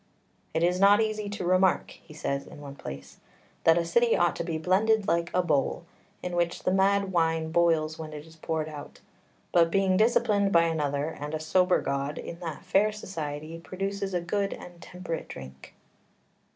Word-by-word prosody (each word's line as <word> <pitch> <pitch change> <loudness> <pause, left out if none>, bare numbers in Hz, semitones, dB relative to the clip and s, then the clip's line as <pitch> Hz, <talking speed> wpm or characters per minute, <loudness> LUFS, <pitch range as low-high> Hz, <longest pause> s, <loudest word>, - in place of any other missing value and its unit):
"It 160 - +2
is 180 +1 +2
not 200 +2 +6
easy 215 -2 -1
to 200 -3 -4
remark" 185 +1 +2
(he - - -16
says 140 -2 -3
in - - -12
one 140 -1 -8
place) 70 - -9 0.5
"that 165 0 +6
a 170 - +1
city 235 +7 +3
ought 175 -2 +2
to - - -2
be 165 -2 -3
blended 200 +5 +2
like 170 0 +1
a 180 - +2
bowl, 150 0 0 0.4
in 180 -1 -3
which 175 0 -1
the 185 - +1
mad 195 0 +2
wine 165 -2 +1
boils 160 -2 +2
when 155 -1 -6
it 150 0 -8
is 160 0 -16
poured 160 -1 -3
out, 150 -2 -10 0.5
but 170 -1 +4
being 190 +1 +2
disciplined 215 -2 +3
by 170 -2 +5
another 150 -2 -1
and 150 -1 -5
a - - -3
sober 180 +4 +2
god 140 +1 -2
in 170 - -7
that 170 +1 -6
fair 195 +3 +3
society 160 -6 -6
produces 195 +2 -4
a 175 - +1
good 200 +3 -1
and 175 -1 -11
temperate 180 -2 -6
drink." 65 0 -11
170 Hz, 185 wpm, -27 LUFS, 155-195 Hz, 0.5 s, not